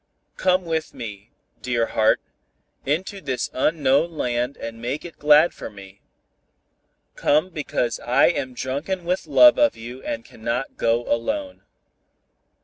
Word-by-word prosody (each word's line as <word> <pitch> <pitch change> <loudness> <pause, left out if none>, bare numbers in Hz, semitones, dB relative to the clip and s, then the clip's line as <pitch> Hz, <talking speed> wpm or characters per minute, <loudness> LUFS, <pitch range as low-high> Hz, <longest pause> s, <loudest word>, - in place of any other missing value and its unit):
Come 185 -1 +2
with 160 -1 -3
me, 105 -1 -8 0.3
dear 120 -2 0
heart, 110 -1 +2 0.7
into 185 +7 -2
this 130 -5 -3
unknown 145 +3 +2
land 125 +1 -1
and 115 0 -7
make 130 +7 -3
it 170 - -11
glad 150 +3 +5
for - - -8
me. 100 -1 -14 1.1
Come 155 +6 +2
because 130 -7 -2
I 120 +2 +3
am 130 -7 -3
drunken 150 +9 -3
with 180 +2 -1
love 305 +1 +7
of 295 -1 +3
you 120 +3 -9
and 115 -2 -5
cannot 120 +4 -4
go 115 +1 +1
alone. 280 - -2
135 Hz, 135 wpm, -23 LUFS, 115-170 Hz, 1.1 s, love